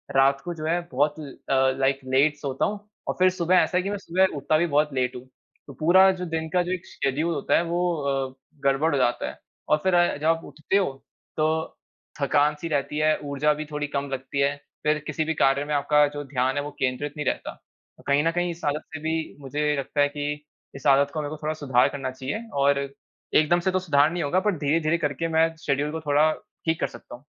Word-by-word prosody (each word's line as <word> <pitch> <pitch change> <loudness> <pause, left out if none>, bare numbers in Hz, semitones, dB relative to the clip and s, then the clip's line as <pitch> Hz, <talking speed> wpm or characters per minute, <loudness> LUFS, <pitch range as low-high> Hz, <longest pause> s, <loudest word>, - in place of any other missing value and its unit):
रात 135 +1 +4
को 175 - -3
जो 155 -2 -6
है, 170 +2 +1
बहुत 145 +3 +1
ल 145 -3 -7 0.2
अ, 130 -1 +4
लाइक 135 0 +2
लेट 135 +3 +3
सोता 140 -3 -1
हूँ 210 0 -2 0.3
और - - 0
फिर 185 0 +6
सुबह 185 0 +1
ऐसा 180 0 +3
है 180 - +1
कि 195 - -2
मैं 205 - -2
सुबह 190 -1 +1
उठता 150 +3 +1
भी 170 - +2
बहुत 150 0 +2
लेट 125 -1 0
हूँ। 125 +1 -9 0.4
तो 140 - -9
पूरा 180 +7 +5
जो 180 -1 -5
दिन 160 0 -2
का 180 - +4
जो 175 - -4
एक 185 -2 -3
शेड्यूल 150 +5 -1
होता 145 - +1
है, - - +2
वो 175 +1 0 0.4
अ, - - -22 0.3
गड़बड़ 140 +4 +3
हो - - +2
जाता 120 -2 +1
है - - -12 0.3
और 150 - +5
फिर 190 -1 +2
अ, 175 -4 +3
जब 150 - -5
आप 165 0 +2
उठते 155 +6 -1
हो, 190 -8 +1 0.5
तो 160 +1 0 0.4
थकान-सी 150 +3 +2
रहती 150 -1 -1
है, 155 0 +3
ऊर्जा 145 +1 +1
भी 155 +1 -5
थोड़ी 150 0 -2
कम 140 0 -3
लगती 135 +1 -4
है। 140 +1 +2 0.3
फिर 150 0 +2
किसी 155 - -1
भी 160 - 0
कार्य 140 -2 +2
में 150 - -3
आपका 150 +1 +4
जो 145 0 -4
ध्यान 130 0 -1
है, 145 - +1
वो 145 - -6
केंद्रित 135 +3 -1
नहीं 150 - -3
रहता। - - -2 0.5
अ, - - -14
कहीं 140 +2 +3
न 165 - +3
कहीं 175 0 -1
इस 170 +1 -10
आदत 150 +1 0
से 145 - -5
भी 160 +1 0 0.3
मुझे 150 +2 -1
लगता 140 +1 -1
है 145 - +5
कि 145 0 -1 0.4
इस 135 +1 -4
आदत 140 +1 +4
को 155 - -2
मेरे 145 - -4
को 155 - -6
थोड़ा 155 - 0
सुधार 125 -3 +4
करना 135 -2 -4
चाहिए 140 - -5 0.2
और 140 0 +4 0.6
एकदम 155 +3 +4
से 185 +2 0
तो 185 - +1
सुधार 150 -3 +3
नहीं 175 -2 -2
होगा, 160 +6 +2
बट 210 +2 +1
धीरे-धीरे 155 +3 +1
करके 150 0 -2
मैं 165 0 +2
शेड्यूल 145 +1 0
को 160 - -4
थोड़ा 150 +1 +3 0.3
ठीक 160 0 +1
कर - - +2
सकता - - -11
हूँ। 125 - -17
150 Hz, 240 wpm, -25 LUFS, 140-165 Hz, 0.6 s, फिर